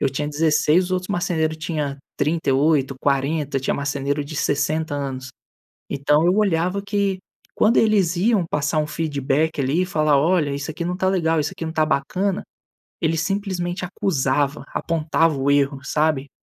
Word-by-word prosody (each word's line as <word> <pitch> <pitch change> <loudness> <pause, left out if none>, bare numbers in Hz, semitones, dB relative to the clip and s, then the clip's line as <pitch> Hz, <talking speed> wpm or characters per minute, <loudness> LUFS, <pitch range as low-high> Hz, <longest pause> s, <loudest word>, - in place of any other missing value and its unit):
Eu - - +2
tinha 145 +2 -3
16, 155 +3 +2
os - - -8
outros 185 0 -2
marceneiro 165 -4 0
tinha 155 -3 -3 0.2
38, 145 -2 +1
40, 140 +1 0
tinha 130 - -1
marceneiro 140 0 -2
de 150 +2 -7
60 150 +2 0
anos. 135 -2 -4 0.6
Então, 150 +3 +2
eu 180 +2 +3
olhava 185 -1 +1
que 200 -2 -1 0.4
quando 225 +3 +3
eles 200 -6 +3
iam 205 0 +2
passar 150 +1 0
um 150 - -1
feedback 150 0 -1
ali 140 +7 +1
e - - -2
falar: 155 -5 +2
"Olha 160 -1 +2
isso 140 +3 -4
aqui 170 +2 -5
não 180 +1 -2
tá 190 - 0
legal, 165 -4 +1
isso 145 -1 -1
aqui 165 - -5
não 160 - -4
tá 155 -1 +2
bacana", 185 +7 -1 0.6
ele 165 0 +1
simplesmente 185 0 -2
acusava, 145 -6 0
apontava 165 -1 0
o 135 +1 0
erro, 140 -1 +2
sabe? 150 -3 0
155 Hz, 165 wpm, -22 LUFS, 145-175 Hz, 0.6 s, eu